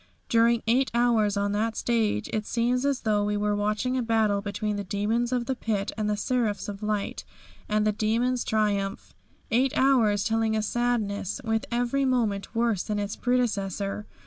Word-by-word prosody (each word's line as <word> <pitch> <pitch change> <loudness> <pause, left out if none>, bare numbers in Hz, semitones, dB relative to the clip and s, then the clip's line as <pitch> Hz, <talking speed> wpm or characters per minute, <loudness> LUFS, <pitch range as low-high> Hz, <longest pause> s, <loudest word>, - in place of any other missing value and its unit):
During 230 0 +3
eight 250 +4 +2
hours 225 -4 +2
on 200 0 0
that 220 +2 -1
stage 225 - 0
it 215 -1 -2
seems 245 +3 +1
as 280 -2 0
though 210 -2 +1
we 205 0 0
were 210 0 0
watching 210 +5 0
a 255 - +1
battle 220 -3 +1
between 210 +1 -3
the 205 - -3
demons 215 +5 -1
of 245 -1 0
the 265 - -1
Pit 215 -5 -2
and 215 -1 -1
the 210 - 0
seraphs 220 -2 -1
of 200 0 -6
Light, 210 -1 -2 0.5
and 215 0 +2
the 215 - +3
demons 230 +4 0
triumph. 205 -2 -1 0.4
Eight 255 +4 +2
hours 230 -7 +3
telling 225 0 +1
a 215 - 0
sadness, 220 -3 -1
with 225 -1 0
every 245 +3 0
moment 220 -5 0
worse 230 -5 +1
than 210 -1 -3
its 205 0 -3
predecessor. 210 -5 -1
220 Hz, 175 wpm, -26 LUFS, 205-240 Hz, 0.5 s, During